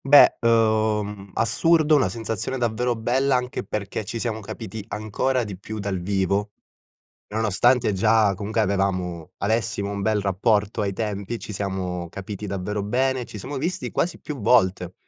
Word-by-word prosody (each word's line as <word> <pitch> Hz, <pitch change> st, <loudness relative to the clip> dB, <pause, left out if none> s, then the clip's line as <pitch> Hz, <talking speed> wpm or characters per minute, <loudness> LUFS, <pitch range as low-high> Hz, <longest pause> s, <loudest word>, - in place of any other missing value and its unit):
Beh, 145 Hz, +1 st, +8 dB
uhm, 110 Hz, -3 st, +2 dB
assurdo, 155 Hz, +7 st, +3 dB
una 140 Hz, -, +3 dB
sensazione 115 Hz, +2 st, -3 dB
davvero 120 Hz, 0 st, 0 dB
bella 130 Hz, +4 st, +1 dB
anche 125 Hz, 0 st, -2 dB
perché 100 Hz, +1 st, -4 dB
ci 105 Hz, -, -5 dB
siamo 115 Hz, -1 st, -2 dB
capiti 110 Hz, 0 st, -7 dB
ancora 115 Hz, +5 st, -1 dB
di 100 Hz, -4 st, -7 dB
più 110 Hz, +2 st, -7 dB
dal 100 Hz, -3 st, -2 dB
vivo, 100 Hz, +2 st, 0 dB, 0.7 s
nonostante 110 Hz, +3 st, +2 dB
già 105 Hz, +1 st, +3 dB
comunque 105 Hz, +3 st, -1 dB
avevamo 95 Hz, -4 st, -1 dB
avessimo 100 Hz, -2 st, 0 dB
un 100 Hz, 0 st, -3 dB
bel 105 Hz, +1 st, +1 dB
rapporto 100 Hz, +2 st, +1 dB
ai 100 Hz, -2 st, 0 dB
tempi, 105 Hz, +1 st, -3 dB
ci -, -, -7 dB
siamo 95 Hz, -3 st, -3 dB
capiti 100 Hz, +3 st, -7 dB
davvero 100 Hz, +2 st, -3 dB
bene, 130 Hz, +4 st, 0 dB
ci 110 Hz, -, -9 dB
siamo 135 Hz, +8 st, -5 dB
visti 175 Hz, +7 st, -2 dB
quasi 175 Hz, -, -1 dB
più 150 Hz, -3 st, -6 dB
volte. 95 Hz, -6 st, +3 dB
105 Hz, 150 wpm, -24 LUFS, 100-120 Hz, 0.7 s, Beh